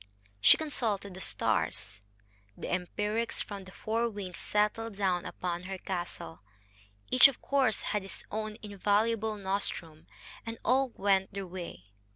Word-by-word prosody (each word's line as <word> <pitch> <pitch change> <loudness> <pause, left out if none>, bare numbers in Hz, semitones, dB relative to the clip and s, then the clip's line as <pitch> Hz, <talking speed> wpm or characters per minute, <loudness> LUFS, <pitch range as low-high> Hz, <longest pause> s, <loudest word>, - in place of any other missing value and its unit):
She - - +8
consulted 220 -10 -1
the 185 - -8
stars, 100 - -1 0.5
and - - -7
empirics 210 +5 -1
from 200 -2 -7
the 185 - -11
four 230 +4 0
winds 200 -4 -6
settled 210 +1 +1
down 185 -3 +1
upon 175 0 -3
her 190 0 -4
castle. 175 - -4 0.7
Each, 255 - +10
of 275 - -5
course, 270 -6 +2
had 210 - 0
his 195 - -6
own 215 0 -3
invaluable 210 +2 +1
nostrum; 190 -5 -3 0.4
and 230 0 -5
all 260 +2 +4
went 195 -1 +2
their 195 -1 -3
way. 170 - -8
200 Hz, 140 wpm, -31 LUFS, 185-220 Hz, 0.7 s, Each